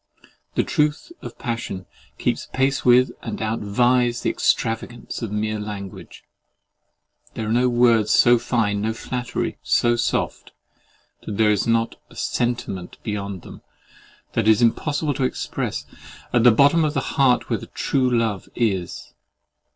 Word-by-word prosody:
The - - +2
truth 150 - 0
of - - -9
passion 115 -6 -4 0.3
keeps - - -1
pace 135 +1 +1
with 125 0 +5
and 115 - -5
outvies 120 +3 +1
the - - +1
extravagance 115 +2 -1
of 115 -4 -4
mere 105 0 -1
language. 105 -2 -8 1.1
There 110 - -3
are 105 - -2
no 125 +1 +3
words 120 -3 +3
so 120 0 +5
fine, 105 -4 0
no 110 +1 -1
flattery 125 +1 -4
so 120 0 +2
soft, 120 - -2 0.7
that 100 - -6
there 110 -1 +4
is 105 +1 0
not 115 0 +1
a - - -17
sentiment 120 -7 -2
beyond 100 -4 -4
them, - - -11 0.7
that 115 -2 0
it - - +8
is 110 +2 +3
impossible 145 +5 +1
to 135 - -2
express, 130 - -3 0.5
at 120 -2 +4
the 120 - +8
bottom 140 +8 +4
of 155 0 0
the - - -2
heart 130 -3 +3
where - - +1
true 130 -2 -1
love 115 -5 -1
is. 95 -7 -2
115 Hz, 145 wpm, -22 LUFS, 105-125 Hz, 1.1 s, it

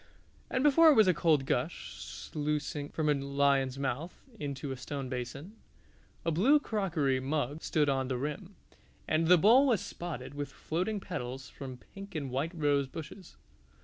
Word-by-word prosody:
and 255 - 0
before 315 +2 +7
it 215 - +7
a 185 - +5
cold 150 -3 +2
gush - - -2
sluicing 150 -1 -4
from 155 -1 -2
a 150 - +5
lion's 140 -1 +1
mouth 140 +5 -3 0.2
into 140 -1 -4
a - - -3
stone 135 +1 -5
basin. 135 - -6 0.7
A 165 - +2
blue 240 - +5
crockery 170 - 0
mug 145 +2 -2
stood 150 -2 +1
on 135 -2 +1
the 130 -1 -1
rim, 150 +9 -5 0.5
and 160 +1 +2
the 180 +1 +7
bowl 235 - +6
was 235 -7 +3
spotted 170 -9 -6
with 145 -1 -5
floating 185 +6 -2
petals 130 -7 -6
from 130 -2 -8
pink 195 +8 -12
and 140 -4 -3
white 145 +7 -1
rose 145 -3 +2
bushes. 160 +6 -10
150 Hz, 160 wpm, -31 LUFS, 135-180 Hz, 0.7 s, before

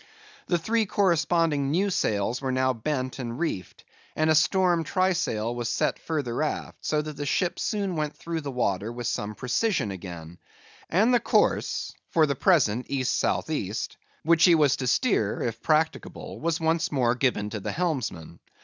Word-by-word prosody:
The 175 - +2
three 220 +5 0
corresponding 165 -6 +2
new 190 +7 +1
sails 110 - 0
were 135 -1 -1
now 130 0 +2
bent 130 +2 -3
and 120 -2 -4
reefed, 125 - -4 0.3
and 155 0 +2
a - - +6
storm 175 +2 +3
trysail 170 - 0
was 120 -1 -2
set - - 0
further 140 -7 -2
aft; 155 - -3
so 150 -1 0
that 150 -1 -7
the 145 - -3
ship 175 +5 0
soon 200 -4 -1
went 150 -1 -2
through 165 -1 -4
the 145 - -5
water 110 -5 -1
with 120 0 -6
some 105 -2 -2
precision 125 - 0
again; 85 -3 -8 0.5
and 220 +8 +3
the 245 - +5
course—for 160 -7 +1
the 140 - 0
present, 125 - +2
East 130 -2 0
south - - 0
east—which 165 0 -1
he 175 -2 +7
was 150 -4 +4
to 130 - -3
steer, 120 - +1
if 115 -1 -3
practicable, 160 +1 -1
was 165 0 -1
once 160 0 +1
more 125 -5 +2
given 125 -5 0
to 110 - -4
the - - -4
helmsman. 125 - -3
145 Hz, 165 wpm, -26 LUFS, 120-170 Hz, 0.5 s, he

